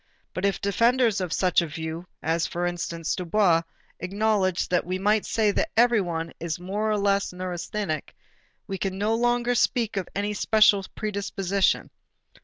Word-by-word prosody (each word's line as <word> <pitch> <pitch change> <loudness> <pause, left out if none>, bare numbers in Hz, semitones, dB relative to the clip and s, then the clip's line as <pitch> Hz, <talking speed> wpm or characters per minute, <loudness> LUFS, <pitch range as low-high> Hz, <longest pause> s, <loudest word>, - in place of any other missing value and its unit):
But 185 - -2
if 200 - +1
defenders 230 +2 +2
of 180 -3 -3
such 180 -1 +3
a 170 - -3
view, 160 +3 -6 0.2
as 165 +1 +1
for 175 +1 -2
instance, 170 -2 -2
Dubois, 180 -2 +2 0.4
acknowledge 195 -1 0
that 180 -1 +2
"we 185 +1 -3
might 210 +2 +1
say 215 -2 +2
that - - -1
everybody 185 -9 +2
is 170 -1 -3
more 205 +4 -2
or 215 - +1
less 200 0 +1
neurasthenic," 180 -2 -4 0.5
we 195 -1 -5
can 190 -1 -2
no 210 +3 +1
longer 240 +1 +1
speak 230 -2 +1
of 185 - -3
any 205 +1 -1
special 210 -1 +4
predisposition. 200 -2 -1
195 Hz, 155 wpm, -25 LUFS, 175-215 Hz, 0.5 s, special